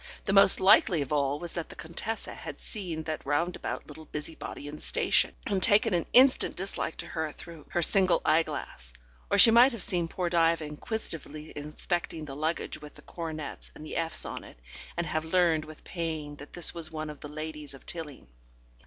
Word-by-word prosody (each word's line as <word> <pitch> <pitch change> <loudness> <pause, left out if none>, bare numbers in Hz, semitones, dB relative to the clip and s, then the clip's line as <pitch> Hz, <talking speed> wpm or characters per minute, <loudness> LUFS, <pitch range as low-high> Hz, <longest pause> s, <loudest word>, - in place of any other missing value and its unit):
The 195 - 0
most 195 -1 +7
likely 180 -4 +5
of 140 - -5
all 140 -1 +1
was 170 +2 -5
that 170 -2 -4
the - - -9
Contessa 190 +7 -4
had - - -8
seen 175 -7 -5
that 155 0 -4
roundabout 155 +6 -2
little 155 +1 -11
busybody 150 -1 -6
in 150 +1 -7
the - - -14
station, - - +2
and 200 -6 0
taken 205 -1 +4
an 170 -2 0
instant 260 +1 +6
dislike 190 -3 -2
to - - -3
her 160 -2 -3
through 165 -2 -12
her 175 - 0
single 185 0 +4
eyeglass. 155 - 0 0.4
Or - - +3
she 225 - +10
might 240 +3 +7
have 220 -6 -5
seen 175 -2 0
poor 180 +1 -2
Diva 165 -2 +2
inquisitively 155 -2 -5
inspecting 155 +2 -1
the 135 -2 -7
luggage 155 +1 -2
with 150 -1 -11
the - - -14
coronets 160 -3 -6
and 155 - -10
the - - -6
Fs 165 -1 +1
on - - -5
it, - - -14 0.4
and 170 - 0
have 155 0 -1
learned 165 -2 +2
with 155 0 -12
pain 160 -4 -4
that 145 - -12
this 175 - 0
was 165 -2 -5
one 155 -1 -4
of 150 - -12
the 145 - -8
ladies 150 -1 -6
of 135 - -16
Tilling. 160 -5 -7
160 Hz, 195 wpm, -29 LUFS, 150-175 Hz, 0.4 s, she